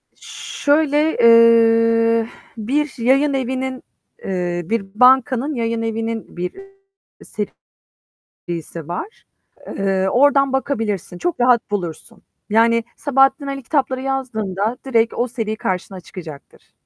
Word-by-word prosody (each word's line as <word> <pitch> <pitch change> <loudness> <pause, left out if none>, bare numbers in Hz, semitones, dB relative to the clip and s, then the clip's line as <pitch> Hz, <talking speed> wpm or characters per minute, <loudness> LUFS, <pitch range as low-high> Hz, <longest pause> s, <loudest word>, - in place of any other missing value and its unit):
Şöyle, 300 +1 0
eee, 230 0 +5 0.3
bir 270 +6 -1
yayınevinin, 260 0 0 0.4
eee, 175 -2 -2
bir 225 +2 -2
bankanın 260 +3 +4
yayınevinin 225 -2 -3
bir 180 +1 -3 1.7
serisi 165 -2 -8
var. 180 - -6 0.5
Eee, 190 -1 0
oradan 275 +1 +3
bakabilirsin, 215 - -2
çok 350 - -2
rahat 245 -3 +2
bulursun. 190 +2 -5 0.3
Yani, 230 +2 +3
Sabahattin 270 0 +2
Ali 275 -1 -5
kitapları 260 -1 -1
yazdığında 230 -5 -2
direkt 230 -3 +1
o 245 - -1
seri 225 -3 -3
karşına 190 -1 -4
çıkacaktır. 165 -5 -12
230 Hz, 95 wpm, -19 LUFS, 210-265 Hz, 1.7 s, eee